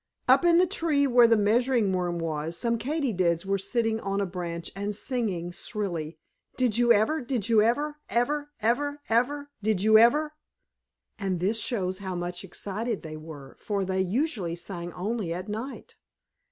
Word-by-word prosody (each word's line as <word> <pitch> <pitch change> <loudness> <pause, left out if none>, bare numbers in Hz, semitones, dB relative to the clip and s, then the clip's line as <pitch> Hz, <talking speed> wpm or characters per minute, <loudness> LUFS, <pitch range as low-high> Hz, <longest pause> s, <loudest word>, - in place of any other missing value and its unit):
Up - - +6
in 340 -1 +5
the 360 - +6
tree 325 -6 +1
where 245 -3 +6
the 230 -1 +4
Measuring 225 0 +2
Worm 175 -1 -1
was, 165 0 -3
some 235 +4 0
Katydids 210 - 0
were 195 0 0
sitting 225 +3 0
on 195 -1 -2
a 200 - +1
branch 175 -2 -5
and 200 +1 -3
singing 205 -8 -2
shrilly: 175 -4 -4 0.4
"Did 250 -5 +2
you 240 0 +4
ever? 230 +9 +3
Did 240 -4 -2
you 220 -2 +5
ever? 290 +7 +1
Ever? 290 +5 0
Ever? 285 +6 0
Ever? 285 +5 +1
Did 210 -2 0
you 220 0 +7
ever?" 300 +7 +4 0.9
And 190 -3 -1
this 205 +6 +1
shows 190 -5 -1
how 190 -2 -4
much 175 +1 -4
excited 205 +4 -4
they 155 -1 -7
were, 155 -3 -10
for 200 -2 -2
they 190 0 0
usually 195 - -1
sang 175 0 -6
only 195 -3 -2
at 180 +1 -6
night. 225 +6 -6
210 Hz, 165 wpm, -27 LUFS, 180-245 Hz, 0.9 s, you